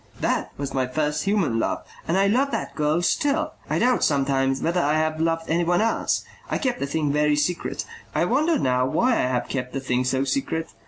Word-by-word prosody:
"That - - -1
was 140 -1 -4
my 130 -1 0
first 150 +4 -1
human 195 - +1
love. - - -2 0.2
And 170 - +1
I 195 - +4
love 255 +8 +2
that - - -3
girl 155 +3 +1
still. 295 - +1 0.2
I - - +1
doubt 250 0 +2
sometimes 135 -2 +1
whether 175 +2 +1
I 150 0 +2
have 155 0 +1
ever 155 +1 -2
loved 165 0 0
anyone 175 +2 +2
else. 225 +1 +1 0.3
I - - 0
kept 255 -3 -1
the 140 - -2
thing 150 0 0
very 150 0 +3
secret. 165 +4 -1 0.3
I - - +2
wonder 320 +1 +2
now 125 - +1
why 200 - +2
I 225 - +2
have 125 -1 -1
kept 125 -2 -4
the 135 - -1
thing 125 -1 0
so 130 +1 +1
secret. 165 - -2
155 Hz, 215 wpm, -24 LUFS, 135-195 Hz, 0.3 s, I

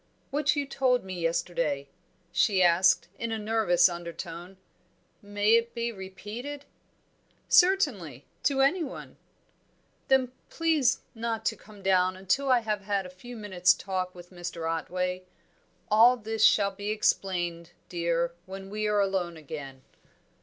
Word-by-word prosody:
"What 295 +1 +1
you 285 -1 -1
told 260 -2 +1
me 185 -2 -6
yesterday," 165 -4 -1 0.4
she 185 +2 +3
asked, 175 +1 +4
in 230 -1 -3
a 225 - -1
nervous 210 -5 +3
undertone, 175 +1 -7 0.6
"may 205 +1 +2
it 230 +1 0
be 235 0 -1
repeated?" 215 +8 -8 0.8
"Certainly 245 - +3 0.2
to 270 -2 +2
anyone." 285 +1 -1 0.9
"Then 260 -2 +3 0.2
please 315 -6 +1
not 225 -1 -3
to 220 - +1
come 205 -1 -16
down 185 -1 +3
until 195 +9 0
I 250 -2 +5
have 215 -2 -2
had 200 -1 -1
a 180 - -9
few 240 +7 -11
minutes' 185 -4 +3
talk 185 -1 -4
with 175 0 -13
Mr. 175 -2 -5
Otway. 180 +3 -2 0.7
All 235 +4 +6
this 220 -1 -2
shall 200 -2 +5
be 205 +1 -6
explained, 175 -5 0 0.2
dear, 170 -1 -1
when 195 +1 -8
we 215 0 -1
are 210 -1 +2
alone 185 -4 -1
again." 140 -3 -8
195 Hz, 135 wpm, -28 LUFS, 175-230 Hz, 0.9 s, All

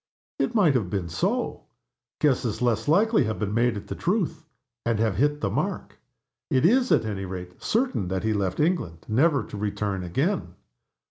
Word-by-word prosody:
It 235 - 0
might 185 -10 +5
have 110 -9 0
been 90 -3 -2
so 80 - -1 0.5
guesses 125 -6 +1
less 115 -3 +1
likely 205 - +4
have 110 0 -2
been 105 -1 -2
made 120 0 +2
at 100 - -7
the - - -5
truth, 180 -4 -1 0.4
and 115 -2 +1
have 110 -4 +1
hit 145 +2 +1
the - - 0
mark. - - -3 0.5
It 130 +3 +2
is, 250 +6 +4
at - - +4
any 100 -3 -3
rate, 90 -1 -8
certain 235 - 0
that 95 +1 -2
he 110 0 +1
left 95 -3 -1
England, 150 - 0
never 140 +6 +3
to 105 - -8
return 100 -1 -2
again. 135 - -1
115 Hz, 180 wpm, -25 LUFS, 100-160 Hz, 0.5 s, might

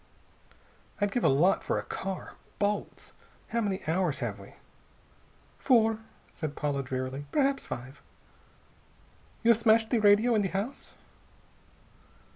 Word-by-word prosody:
"I'd 205 -1 +1
give 245 - -1
a - - +5
lot 155 +8 +3
for - - -1
a - - -2
car. 190 -1 -5 0.2
Bolts.... 205 0 -2 0.4
How 235 - 0
many 195 -3 -1
hours 165 -2 +1
have 110 -5 -4
we?" 100 - -14 1.0
"Four," 225 -3 +3 0.3
said 150 -3 -5
Paula 145 -2 -1
drearily. 130 +2 -4
"Perhaps 275 -1 +1
five. 130 +4 -7 1.4
You 230 - +6
have 230 - +3
smashed 225 0 +3
the 240 - +3
radio 210 +3 +5
in 215 - +3
the 195 - 0
house?" 200 +8 -5
200 Hz, 130 wpm, -29 LUFS, 145-225 Hz, 1.4 s, You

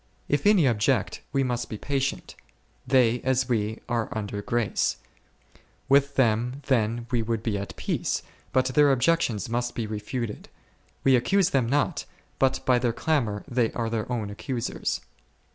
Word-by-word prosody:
If 145 +7 +1
any 195 -9 +5
ob 115 -4 +1
ject, - - +1
we 135 -1 +2
must 120 -2 -2
be 110 - -5
patient; 135 +2 -2 0.5
they, 125 -2 +3
as 130 -1 +1
we, 110 -2 -1
are 120 -2 -1
under 105 -1 -4
grace, 115 -1 0 0.9
with 140 +1 +3
them 120 +1 +2
then 115 -3 +1
we 120 -2 +2
would 115 -1 -2
be 110 -3 -1
at 100 -2 -5
peace, - - -2 0.3
but 130 -1 +3
their 145 0 +5
objec 150 +6 +3
tions 105 -4 -1
must 120 +1 -2
be 115 - -2
refuted; 110 +2 -5 0.5
we 135 -1 +5
accuse 190 +10 +2
them 130 -4 +2
not, 145 +2 0 0.3
but 130 0 +1
by 125 -1 +4
their 120 -1 0
clamour 120 -8 0
they 120 -2 +1
are 115 -2 -2
their 115 +1 -2
own 110 -4 -2
accusers. 120 +3 -3
120 Hz, 160 wpm, -26 LUFS, 110-135 Hz, 0.9 s, any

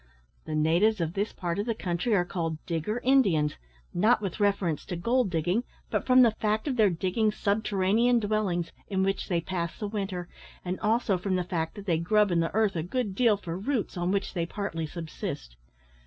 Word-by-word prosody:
The 155 - -3
natives 170 +8 +3
of 165 -1 -1
this 205 +3 -1
part 175 0 -3
of 205 - -2
the 230 - 0
country 185 +4 0
are 175 -2 +2
called 165 -3 -3
digger 175 +8 -2
Indians, 195 - +3 0.4
not 215 +7 +4
with 195 -1 -4
reference 195 -6 +1
to 180 - -4
gold 235 +5 +1
digging, 175 +7 0 0.3
but - - -1
from 255 0 +7
the 235 - +5
fact 215 +3 -1
of 270 - 0
their 215 -4 +5
digging 190 +5 0
subterranean 210 +3 +2
dwellings, 205 -6 -1 0.2
in 190 -2 0
which 195 0 -1
they 170 -2 +1
pass 170 -2 -3
the 210 - -3
winter, 195 -4 -3 0.4
and 180 +1 -3
also 215 -3 +1
from 190 +1 -1
the 180 - 0
fact 170 -1 -3
that 205 -2 -9
they 170 -5 +1
grub 210 +4 +3
in 170 - +2
the 165 0 +1
earth 215 -3 +2
a 165 - 0
good 205 +4 -2
deal 220 0 +3
for 170 -4 -6
roots, 215 +4 -2
on 175 0 -1
which 195 +1 -1
they 170 -3 -1
partly 165 -5 -3
subsist. 150 - -6
195 Hz, 200 wpm, -28 LUFS, 170-215 Hz, 0.4 s, from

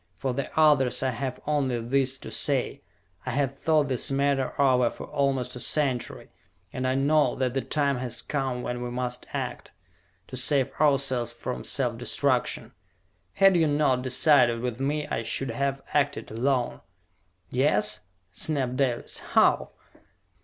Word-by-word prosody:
For 130 -2 -2
the 140 +1 -3
others 145 -6 +4
I 130 - +1
have 130 +1 -4
only 140 -5 0
this 130 +3 0
to - - -9
say: - - 0 0.4
I - - -5
have 135 -1 0
thought 155 -3 +2
this 130 -3 0
matter 140 -1 0
over 125 -3 +4
for - - -9
almost 135 -3 -1
a - - -6
century, 130 -1 -2 0.4
and 130 0 -2
I 130 - +1
know 145 +3 +3
that 130 -2 -1
the 135 - 0
time 140 -2 0
has 125 -2 -2
come 130 -4 -2
when 125 0 -3
we 125 - -3
must 125 0 -4
act, - - -4 0.6
to - - -8
save 130 +1 +1
ourselves 135 -5 +2
from 120 +1 -5
self 120 -4 -1
destruction. 130 0 0 0.6
Had 195 -1 +5
you 165 -2 +3
not 145 -3 +2
decided 130 -2 +3
with 125 -1 -3
me, 145 +2 -1
I - - -2
should 115 +4 -2
have 140 0 -2
acted 140 -4 0
alone!" 125 +2 0 0.7
"Yes?" 125 -4 +2 0.3
snapped 130 - -1
Dalis. 130 -4 -1
"How?" - - +2
130 Hz, 155 wpm, -26 LUFS, 125-140 Hz, 0.7 s, Had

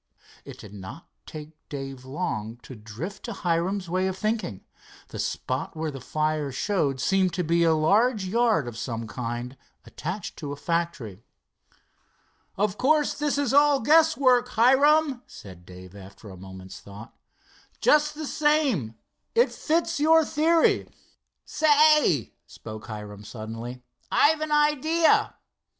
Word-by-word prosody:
It - - -10
did 105 - -12
not 100 - -10 0.2
take 155 0 -9 0.2
Dave 135 -2 -7
long 115 -4 -4
to - - -10
drift 115 - -8
to 235 - -5
Hiram's 180 +1 -1
way 185 +2 0
of 190 0 -4
thinking. 215 - -3 0.4
The - - -8
spot 130 +4 -3
where 160 -1 -2
the 135 -2 -9
fire 155 +1 -2
showed 140 -3 -1
seemed 185 +3 +1
to 180 - -1
be 170 +1 +2
a 165 -1 +4
large 205 +7 +2
yard 220 - +1
of 115 -2 -7
some 115 0 -4
kind, 120 +2 -5 0.3
attached 180 +4 -6
to 145 -2 -6
a - - -4
factory. 165 - -3 1.4
"Of 205 0 -1
course 295 +2 +2
this 295 -1 -1
is 280 -3 0
all 290 0 +5
guess 320 +6 +4
work, 250 -2 +3
Hiram," 270 +3 +3
said 90 -3 -13
Dave, 90 +1 -12
after 100 +1 -12
a - - -10
moment's 95 +1 -11
thought. 105 +3 -12 0.6
"Just 300 0 +3
the 310 +1 -5
same, 280 - +1 0.4
it 475 +1 +4
fits - - -13
in 335 +1 +1
to - - -4
your 320 -1 +6
theory." 320 +2 +2 0.6
"Say," 300 - +3
spoke 110 0 -10
Hiram 105 -1 -8
suddenly, 115 +3 -8 0.3
"I've 310 +1 +3
an 310 -1 -3
idea." 300 +2 +2
170 Hz, 145 wpm, -25 LUFS, -, 1.4 s, your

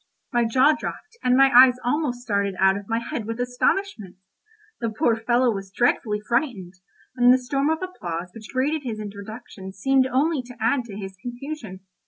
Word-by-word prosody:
My 240 -1 +3
jaw 260 +6 +4
dropped, 435 +9 -7
and 250 0 +3
my 270 0 +6
eyes 250 0 +8
almost 250 -2 -1
started 200 -4 -1
out 190 0 +4
of 200 +1 -7
my 225 - +1
head 230 -1 -4
with 230 +2 -5
astonishment. 245 - -1 0.6
The 230 - -1
poor 220 +1 +1
fellow 240 +2 +2
was 195 -1 -6
dreadfully 210 0 +1
frightened, 235 - -1 0.4
and 245 -1 +6
the 255 - +6
storm 275 +3 -1
of 320 +3 -1
applause 180 - -5
which 215 -2 -11
greeted 280 +4 0
his 230 -5 -5
introduction 200 -1 -9
seemed 260 +6 +2
only 280 +3 +1
to 245 0 -13
add 235 +3 +1
to 210 -4 -9
his 190 -2 -7
confusion. 245 -3 -7
240 Hz, 180 wpm, -24 LUFS, 210-265 Hz, 0.6 s, eyes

